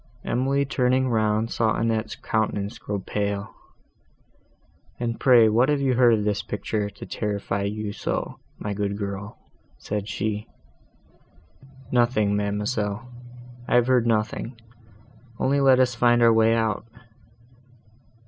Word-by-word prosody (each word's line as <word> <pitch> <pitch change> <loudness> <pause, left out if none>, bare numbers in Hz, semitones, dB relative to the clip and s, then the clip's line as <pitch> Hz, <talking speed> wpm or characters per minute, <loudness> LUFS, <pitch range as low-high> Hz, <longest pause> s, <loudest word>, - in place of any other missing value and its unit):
Emily, 135 +3 +1
turning 130 -1 +1
round, 110 0 +1
saw 110 -1 +1
Annette's 110 -1 -1
countenance 105 -2 -2
grow 105 - -3
pale. 100 +1 -3 1.5
"And 115 -1 -3
pray, 120 -4 +6
what 120 +5 +3
have 145 -1 +2
you 135 -2 +1
heard 120 -2 +5
of 105 - -2
this 105 0 0
picture, 105 0 -3
to - - -11
terrify 100 -2 -3
you 105 0 -3
so, - - -4 0.2
my 105 - -4
good 100 0 -2
girl?" 100 0 -5 0.4
said 105 0 -4
she. 105 +1 -3 1.4
"Nothing, 120 -4 +2
ma'amselle: 105 +2 -2 0.6
I - - +1
have 120 -1 +5
heard 125 -2 +2
nothing, 115 +2 -1 0.8
only 140 +1 +2
let 135 -2 +5
us 125 -1 +3
find 120 0 +3
our 115 -1 +6
way 115 0 +4
out." 110 -2 0
110 Hz, 130 wpm, -24 LUFS, 105-120 Hz, 1.5 s, pray